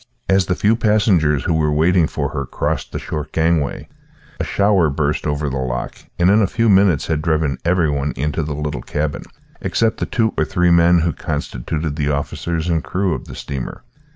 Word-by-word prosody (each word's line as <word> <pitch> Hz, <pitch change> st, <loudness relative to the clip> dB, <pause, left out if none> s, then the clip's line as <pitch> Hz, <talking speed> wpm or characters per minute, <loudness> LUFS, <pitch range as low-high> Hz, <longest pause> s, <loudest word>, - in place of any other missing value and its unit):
As 95 Hz, -1 st, +3 dB
the 90 Hz, -, +1 dB
few 105 Hz, +4 st, +2 dB
passengers 95 Hz, -, +2 dB
who -, -, 0 dB
were 75 Hz, -1 st, +1 dB
waiting 80 Hz, +2 st, +3 dB
for -, -, -3 dB
her 70 Hz, -2 st, -4 dB
crossed -, -, -2 dB
the -, -, -4 dB
short 75 Hz, -1 st, -5 dB
gangway, 80 Hz, -3 st, 0 dB, 0.5 s
a -, -, 0 dB
shower 100 Hz, -5 st, +2 dB
burst 75 Hz, +1 st, -1 dB
over 75 Hz, 0 st, -1 dB
the 70 Hz, 0 st, -2 dB
loch 65 Hz, -1 st, -3 dB, 0.2 s
and 90 Hz, +2 st, +4 dB
in 105 Hz, +2 st, +5 dB
a 100 Hz, -, +3 dB
few 115 Hz, +4 st, +1 dB
minutes 95 Hz, -6 st, +4 dB
had 80 Hz, -2 st, -1 dB
driven 80 Hz, -4 st, 0 dB
every 85 Hz, -1 st, +2 dB
one 70 Hz, +1 st, -1 dB
into 75 Hz, +4 st, -1 dB
the 75 Hz, -1 st, -3 dB
little 75 Hz, 0 st, -3 dB
cabin, 75 Hz, 0 st, -3 dB, 0.4 s
except 115 Hz, -1 st, 0 dB
the -, -, -2 dB
two 110 Hz, -2 st, 0 dB
or -, -, +4 dB
three 90 Hz, -2 st, +1 dB
men 85 Hz, 0 st, +5 dB
who 85 Hz, -1 st, 0 dB
constituted 75 Hz, +5 st, -4 dB
the 75 Hz, -2 st, 0 dB
officers 80 Hz, +3 st, -2 dB
and 80 Hz, -2 st, 0 dB
crew 95 Hz, -2 st, -1 dB
of -, -, -5 dB
the -, -, -10 dB
steamer. 70 Hz, -3 st, -6 dB
80 Hz, 200 wpm, -19 LUFS, 75-90 Hz, 0.5 s, in